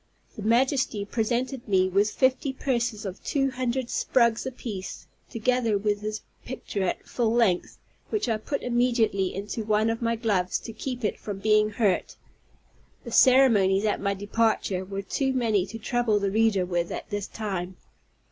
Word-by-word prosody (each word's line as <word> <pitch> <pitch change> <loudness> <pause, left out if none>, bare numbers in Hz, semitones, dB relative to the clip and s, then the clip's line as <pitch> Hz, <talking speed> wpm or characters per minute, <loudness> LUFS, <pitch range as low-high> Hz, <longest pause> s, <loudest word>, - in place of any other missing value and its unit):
His 210 - -7
Majesty 235 -2 +1
presented 240 +4 -2
me 190 -2 +3
with 200 +3 +2
fifty 260 +3 +1
purses 235 -5 -1
of 190 0 -6
two 270 -2 0
hundred 255 0 -2
sprugs 235 -1 +2
apiece, 225 -7 -6 0.2
together 230 -2 +1
with 205 0 -1
his 215 0 -4 0.2
picture 235 -5 -5
at 185 - -2
full 235 -3 0
length, 225 -7 +1 0.3
which 420 -10 -1
I 225 -2 +1
put 275 +6 -4
immediately 235 -6 +1
into 205 +3 -4
one 215 +1 +2
of 225 - -4
my 230 0 +1
gloves, 200 -6 0
to 225 - -8
keep 245 +1 -4
it - - -1
from 205 -2 -5
being 215 +1 +3
hurt. 205 -3 0 0.9
The 235 - -8
ceremonies 225 -6 +5
at 210 - 0
my 200 0 0
departure 205 -2 0
were 195 +1 -5
too 265 +7 -1
many 220 -7 +1
to 225 - -7
trouble 235 -1 +1
the 200 -1 0
reader 215 -3 +2
with 175 -1 -1
at - - -6
this 205 -1 -3
time. 190 -4 -4
220 Hz, 165 wpm, -26 LUFS, 200-245 Hz, 0.9 s, ceremonies